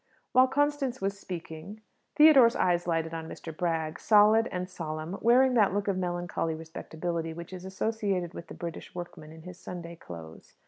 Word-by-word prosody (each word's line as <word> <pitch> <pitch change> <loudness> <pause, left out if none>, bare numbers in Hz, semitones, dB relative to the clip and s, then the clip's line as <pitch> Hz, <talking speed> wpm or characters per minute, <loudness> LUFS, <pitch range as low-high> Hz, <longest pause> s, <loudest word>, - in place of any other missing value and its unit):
While 255 +1 +6
Constance 285 -2 0
was 195 0 -2
speaking, 180 +2 -7 0.4
Theodore's 275 -6 +7
eye 180 -1 +3
lighted 165 -1 0
on 160 0 -5
Mr. 160 -2 -8
Bragg, 160 -2 -1
solid 215 +1 +5
and 180 0 -3
solemn, 165 0 -5
wearing 250 +3 +5
that 205 -5 +3
look 205 0 -1
of 200 - +1
melancholy 175 -2 -2
respectability 165 +1 -4
which 170 +2 -9
is 185 0 -8
associated 190 -3 -2
with 170 - -8
the - - -9
British 170 0 -7
workman 165 -3 -8
in 160 0 -13
his 180 0 -10
Sunday 170 -1 -7
clothes. 80 - -11
180 Hz, 170 wpm, -29 LUFS, 165-210 Hz, 0.4 s, Theodore's